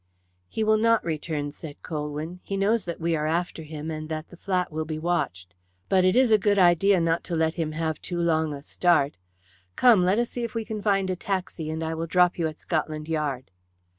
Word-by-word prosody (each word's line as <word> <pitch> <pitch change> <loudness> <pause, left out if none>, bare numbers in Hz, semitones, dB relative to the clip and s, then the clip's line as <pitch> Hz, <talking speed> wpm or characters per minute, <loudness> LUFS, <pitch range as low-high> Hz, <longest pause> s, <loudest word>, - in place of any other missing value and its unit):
"He 220 - -2
will 215 0 +3
not 230 0 +3
return," 155 -2 -3
said 145 0 -11
Colwyn. 150 +3 -4
"He 195 - -4
knows 210 +2 +1
that 170 -1 -5
we 165 0 0
are 155 -1 -1
after 170 +1 -1
him, 155 0 -6
and 155 0 -5
that 155 0 -5
the - - -12
flat 180 -1 -1
will 155 +1 -2
be 155 0 -4
watched. 125 - -2 0.4
But 190 -1 +4
it 185 +1 +3
is 255 -2 +4
a 215 - +6
good 205 0 +2
idea 185 +1 +5
not 165 0 +1
to 175 - -2
let 160 0 +1
him 160 -3 -3
have 160 -1 -2
too 175 - -4
long 160 -2 +1
a 140 -1 -7
start. 155 -4 +2 0.6
Come, 230 -7 +6
let 185 +3 +3
us 240 0 0
see 245 - -4
if 235 0 -5
we 225 -1 -2
can 215 -1 -5
find 195 -2 +1
a - - -1
taxi, 185 -4 -3
and 160 +1 -3
I 160 0 -2
will 165 +1 -3
drop 180 +1 +3
you 165 - +1
at 155 0 -7
Scotland 155 -2 -3
Yard." 145 -8 -2
165 Hz, 225 wpm, -26 LUFS, 155-190 Hz, 0.6 s, a